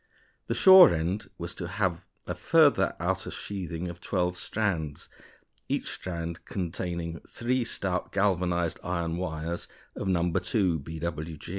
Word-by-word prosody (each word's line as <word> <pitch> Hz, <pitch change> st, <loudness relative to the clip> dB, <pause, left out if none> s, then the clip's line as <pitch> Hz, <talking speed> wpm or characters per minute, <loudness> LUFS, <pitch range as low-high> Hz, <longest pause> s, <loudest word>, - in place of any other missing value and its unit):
The -, -, -1 dB
shore 190 Hz, -1 st, +9 dB
end 90 Hz, +7 st, -2 dB
was 85 Hz, +1 st, -5 dB
to 90 Hz, -, -5 dB
have 95 Hz, -2 st, -1 dB, 0.2 s
a -, -, -3 dB
further -, -, +4 dB
outer -, -, -1 dB
sheathing 90 Hz, -3 st, -5 dB
of 85 Hz, 0 st, -8 dB
twelve 90 Hz, -1 st, 0 dB
strands, 90 Hz, -7 st, -2 dB, 0.6 s
each -, -, -1 dB
strand 85 Hz, -2 st, -5 dB
containing 85 Hz, -2 st, -4 dB
three 125 Hz, +1 st, 0 dB
stout 95 Hz, -5 st, -2 dB
galvanized 90 Hz, -4 st, +1 dB
iron 85 Hz, -1 st, -2 dB
wires 85 Hz, -1 st, -4 dB, 0.3 s
of 100 Hz, -, -4 dB
No. 90 Hz, -2 st, +2 dB
2 90 Hz, -1 st, +1 dB
B.W.G. 80 Hz, +1 st, -5 dB
90 Hz, 130 wpm, -28 LUFS, 85-95 Hz, 0.6 s, shore